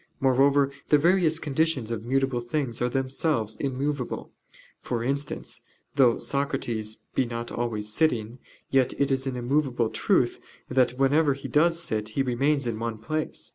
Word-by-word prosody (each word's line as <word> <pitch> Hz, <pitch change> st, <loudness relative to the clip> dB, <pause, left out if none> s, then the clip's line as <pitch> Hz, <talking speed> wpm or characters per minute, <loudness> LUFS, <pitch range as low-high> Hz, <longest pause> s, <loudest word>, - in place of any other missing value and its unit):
Moreover 135 Hz, +1 st, +4 dB, 0.2 s
the 150 Hz, -, +6 dB
various 170 Hz, 0 st, +3 dB
conditions 150 Hz, -6 st, 0 dB
of 110 Hz, -2 st, -3 dB
mutable 135 Hz, 0 st, +1 dB
things 120 Hz, 0 st, -3 dB
are 125 Hz, -, +2 dB
themselves 130 Hz, -3 st, -1 dB
immovable; 140 Hz, -1 st, -3 dB, 0.5 s
for 115 Hz, -2 st, -2 dB
instance, 140 Hz, +3 st, -3 dB, 0.3 s
though 125 Hz, -4 st, +5 dB
Socrates 120 Hz, -6 st, -2 dB, 0.2 s
be -, -, +2 dB
not 120 Hz, -1 st, -5 dB
always 110 Hz, -3 st, -2 dB
sitting, 120 Hz, -5 st, 0 dB, 0.3 s
yet 130 Hz, -2 st, +2 dB
it 140 Hz, 0 st, +2 dB
is 135 Hz, 0 st, 0 dB
an 130 Hz, -, -2 dB
immovable 125 Hz, -2 st, 0 dB
truth -, -, +1 dB, 0.3 s
that 125 Hz, -1 st, +2 dB
whenever 140 Hz, +1 st, +3 dB
he 135 Hz, 0 st, -7 dB
does 165 Hz, +6 st, +3 dB
sit 110 Hz, -6 st, -2 dB
he 135 Hz, -, +3 dB
remains 135 Hz, +3 st, +1 dB
in 115 Hz, -2 st, -2 dB
one 115 Hz, -1 st, -3 dB
place. 155 Hz, +8 st, -3 dB
130 Hz, 150 wpm, -26 LUFS, 120-140 Hz, 0.5 s, the